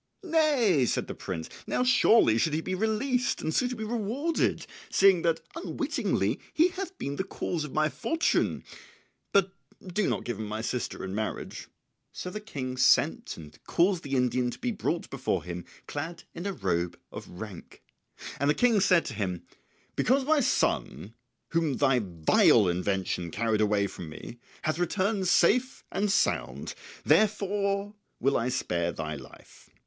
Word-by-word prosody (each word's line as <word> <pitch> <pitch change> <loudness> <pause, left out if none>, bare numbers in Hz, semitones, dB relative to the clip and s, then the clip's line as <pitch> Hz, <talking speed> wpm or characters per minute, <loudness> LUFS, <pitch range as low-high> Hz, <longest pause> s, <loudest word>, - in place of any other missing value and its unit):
"Nay," 285 - +3
said - - 0
the - - -6
prince 80 -4 -5 0.2
"now - - +1
surely 225 - +5
should 155 +3 +1
he 160 - 0
be 185 - -3
released 220 +6 0
and 160 - -2
suitably 245 -1 0
rewarded, 240 +9 -1 0.2
seeing 195 -3 +5
that 165 -1 +1
unwittingly 335 - -1 0.2
he 335 +3 +5
hath 380 0 -6
been 140 0 -4
the - - 0
cause 175 -4 -3
of 150 - -6
my 155 +2 +2
fortune; 240 - 0 0.7
but 195 -1 +3 0.3
do 185 +3 0
not - - -1
give 120 -4 -4
him 110 - -4
my 110 +1 -3
sister 120 +1 -3
in 95 - -5
marriage." 110 +1 -4 0.4
So 180 - -6
the 210 - -4
King 130 -11 -5
sent 130 - +3
and 75 -2 -13
caused 180 0 +2
the 140 -3 -3
Indian 125 -1 +1
to - - -7
be 250 -1 -2
brought 175 -5 -2
before 135 -1 -1
him 90 0 -6 0.2
clad 160 +4 -5
in 175 - -5
a 200 - -2
robe 85 - -1
of - - -8
rank. 105 -6 -9 0.6
And 140 - +2
the 150 - +3
King 240 -4 +4
said 180 -3 +4
to 130 - -5
him, 95 -5 -3 0.5
"Because 265 +3 +2
my 310 +1 +4
son, 110 - 0 0.4
whom 165 -4 +1
thy 135 -3 +3
vile 90 +4 +4
invention 90 -1 -1
carried 110 +3 0
away 105 -1 +2
from 90 -4 -7
me, 115 +9 -10 0.2
hath 155 +1 -1
returned 190 +2 0
safe 250 +9 +3
and 200 +2 0
sound, 65 - 0 0.3
therefore 200 +3 +2 0.3
will 135 +3 +2
I 120 +2 +1
spare 85 -9 -1
thy 80 -2 -4
life. 70 - -14
160 Hz, 160 wpm, -28 LUFS, -, 0.7 s, surely